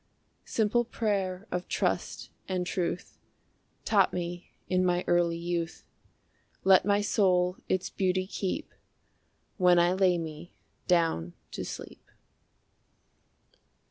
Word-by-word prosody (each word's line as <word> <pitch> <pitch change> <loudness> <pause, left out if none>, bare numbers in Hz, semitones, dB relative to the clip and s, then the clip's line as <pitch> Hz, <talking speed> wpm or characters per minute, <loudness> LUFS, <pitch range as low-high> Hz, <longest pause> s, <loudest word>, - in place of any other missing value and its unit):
Simple 225 +2 +2
prayer 200 -5 -2
of 180 0 -3
trust - - -2 0.2
and 185 -1 -1
truth. 180 0 -3 0.7
Taught 200 -3 +3
me 175 0 -4 0.2
in 185 0 +2
my 180 0 +2
early 175 -1 +2
youth 170 -1 -3 0.8
Let 190 -1 +6
my 205 0 +3
soul 185 -3 +2
its 185 0 0
beauty 185 -1 0
keep 190 0 -4 0.8
When 180 -2 +5
I 175 +1 +4
lay 185 -2 +3
me 160 0 -7 0.3
down 165 - +2 0.2
to - - -4
sleep. - - -8
180 Hz, 110 wpm, -29 LUFS, 175-190 Hz, 0.8 s, Let